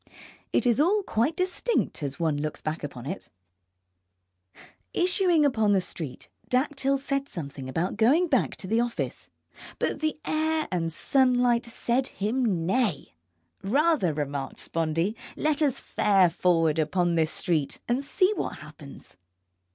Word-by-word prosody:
It - - +2
is 235 0 +3
all 395 +7 +3
quite 240 +2 0
distinct 370 - -1
as 140 0 -4
one 160 -3 +1
looks 155 0 -4
back 155 +1 -4
upon 130 -4 -7
it. 185 +7 -6 1.7
Issuing 355 -3 +3
upon 220 -7 +2
the 195 - +4
street, 160 -7 -6 0.2
Dactyl 275 +1 +1
said 275 0 -2
something 140 -5 -7
about 170 +9 -2
going 270 +11 +4
back 280 -7 +1
to 190 - -7
the 225 +4 +2
office, 240 0 -3 0.5
but - - -1
the 310 0 -1
air 315 0 0
and 165 -2 -1
sunlight 245 - +2
said 240 +2 0
him 210 -5 -1
nay. 205 - 0 0.5
Rather, 280 - +2
remarked 145 -2 -4
Spondee, 165 +5 -1 0.2
let 305 0 0
us 285 -4 +2
fare 195 -4 +3
forward 165 -3 +2
upon 175 +3 +1
this 160 -2 +2
street 160 -6 -1
and 245 +3 0
see 370 +7 +2
what - - -3
happens. 140 - -12
220 Hz, 140 wpm, -27 LUFS, -, 1.7 s, the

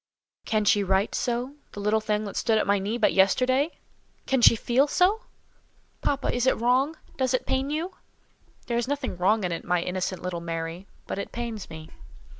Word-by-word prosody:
"Can 215 -1 +1
she 205 0 +4
write 190 +2 +1
so—the 245 0 -3
little 210 +2 +1
thing 215 0 -1
that 200 - -7
stood 225 -2 +2
at - - +1
my 200 0 +2
knee 205 +5 -2
but 220 - +3
yesterday? 255 - +3 0.5
Can 265 -2 +1
she 230 - +8
feel 245 +5 +2
so?" 400 - +2 0.8
"Papa, 280 -1 0
is 245 +1 0
it - - +3
wrong? 260 +6 +2 0.2
Does 260 -1 +1
it - - -2
pain 265 +1 0
you?" 320 +5 -2 0.7
"There 235 -1 0
is 240 - -2
nothing 280 -6 -2
wrong 195 +4 +2
in 180 - -1
it, 165 - -4
my 180 0 +1
innocent 185 0 -3
little 180 -2 -3
Mary; 165 +2 -5 0.2
but - - -4
it - - -5
pains 230 -4 -5
me." 160 -1 -10
225 Hz, 190 wpm, -26 LUFS, 190-260 Hz, 0.8 s, she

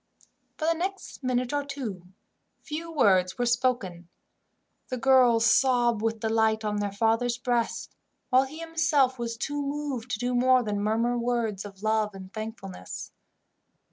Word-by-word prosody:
For 310 - -2
the 330 - +3
next 370 -2 -5
minute 255 0 0
or 290 0 0
two, 240 -11 -6 0.6
few 325 +2 -5
words 190 - +3
were 245 - 0
spoken. 235 -9 0 0.8
The 255 - -2
girls 245 -2 +5
sobbed 240 -2 +3
with 225 -1 -1
delight 220 -1 +1
on 210 0 -1
their 205 -1 -1
father's 225 +3 +1
breast, 240 -2 -1 0.4
while 260 +1 +5
he 290 +4 -10
himself 315 -6 +1
was 230 -1 -3
too 290 +5 -3
moved 280 -4 -4
to 245 - -1
do 245 +3 -1
more 255 +1 +4
than 205 -2 -2
murmur 230 +3 +1
words 235 -4 -1
of 200 0 -11
love 215 -1 +1
and 190 0 -10
thankfulness. 215 - -7
240 Hz, 150 wpm, -27 LUFS, 215-260 Hz, 0.8 s, girls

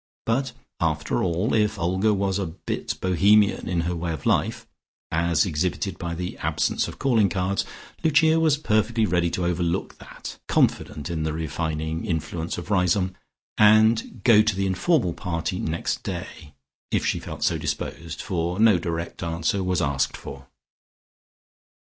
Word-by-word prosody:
But, 125 +2 0 0.3
after 80 -2 0
all, 90 +5 0
if 105 -1 +2
Olga 95 +4 +1
was 100 -1 0
a 95 - -2
bit 80 +3 -5
Bohemian 100 +3 +3
in 85 -1 +1
her 85 +1 -2
way 85 0 -3
of 75 - -7
life, - - +1 0.5
as 85 0 +2
exhibited 90 +2 -2
by 85 -1 -3
the 90 +1 -5
absence - - 0
of - - -8
calling 115 -7 +3
cards, 95 +1 -1 0.4
Lucia 160 +1 +4
was 155 -3 +3
perfectly 110 -3 +1
ready 85 -2 +1
to 90 +1 -2
overlook 90 +1 -1
that - - -9
(confident 75 +3 0
in 80 -2 -2
the 80 0 -1
refining 80 0 -3
influence 80 -2 -3
of 90 +4 -6
Riseholme), 90 0 +2 0.5
and 110 +2 +6
to - - -8
go 115 -2 +4
to 110 -2 +1
the 95 +1 0
informal 95 - +1
party 90 +1 -3
next 80 +1 -2
day, 75 -3 -7 0.3
if - - 0
she - - 0
felt - - -6
so - - +1
disposed, 85 -1 -4
for 90 +1 -2
no 110 -5 +5
direct 85 -1 -4
answer 85 +3 -1
was 90 -1 0
asked 70 -2 0
for. 70 -1 -10
90 Hz, 155 wpm, -24 LUFS, 85-105 Hz, 0.5 s, and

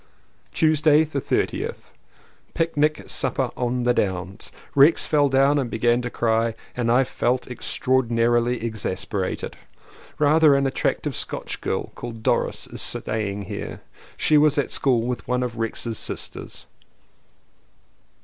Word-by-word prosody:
Tuesday 155 -1 +4
the 145 -3 -3
30th. - - -2 0.6
Picnic 155 -2 +1
supper - - 0
on 125 0 -1
the 125 0 +3
Downs. 95 -1 -3 0.2
Rex 140 +4 +5
fell 145 -2 +3
down 135 +2 +3
and 130 -4 -2
began 120 +2 +1
to 120 - -4
cry 115 -1 0 0.2
and 120 -2 0
I 125 +3 +5
felt 125 0 -1
extraordi 130 0 0
narily 120 +1 +1
exasperated. 100 -3 -3 0.6
Rather 150 0 +5
an 140 0 +2
attractive 135 - -1
Scotch - - -4
girl - - -2
called 115 -2 -8
Doris - - 0
is - - -7
staying 105 -2 -1
here. - - -6 0.4
She 155 -1 +4
was 150 -1 +3
at 145 - 0
school 125 -4 +2
with 125 0 -4
one 125 0 0
of 120 -2 -4
Rex's 115 0 -3
sisters. - - -7
125 Hz, 130 wpm, -23 LUFS, 115-145 Hz, 0.6 s, Rex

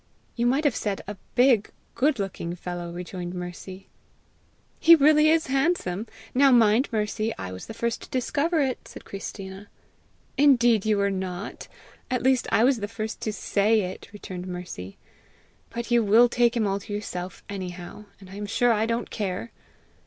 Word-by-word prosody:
"You 235 0 +1
might 270 +5 +2
have 285 -6 +2
said 205 -2 -2
a 205 - -5 0.2
big, 245 -4 +4 0.2
good 275 +3 +2
looking 185 -4 -4
fellow!" 175 -1 -6
rejoined 180 0 -6
Mercy. 180 +2 -8 0.9
"He 335 +1 +8
really 305 0 +5
is 320 0 +3
handsome! 265 - 0 0.3
Now 275 +2 +5
mind, 235 +1 +4
Mercy, 215 0 -1
I 95 -1 -5
was 95 0 -8
the 225 - -8
first 235 0 -2
to - - -11
discover 295 +6 0
it!" 260 -3 -2
said - - -11
Christina. 195 0 -8 0.7
"Indeed 240 -7 +5
you 215 -1 +3
were 200 0 +1
not! 190 +1 -5 0.4
At 255 -2 -1
least 260 -1 +3
I 220 - +4
was 260 +1 +4
the 205 - -3
first 220 0 -5
to 215 - -1
SAY 210 +1 +2
it!" 185 -1 -6
returned 185 -3 -7
Mercy. 175 - -7 0.7
"But 235 +1 -6
you 240 -1 +4
will 225 +4 +6
take 240 0 +2
him 220 - +2
all 195 0 0
to 205 - -11
yourself 185 -3 -5
anyhow, 185 +1 -7
and 195 - -13
I 195 - -8
am 205 0 -4
sure 245 +3 +2
I 220 +1 +1
don't 230 0 -2
care!" 205 +2 -3
215 Hz, 175 wpm, -25 LUFS, 190-245 Hz, 0.9 s, He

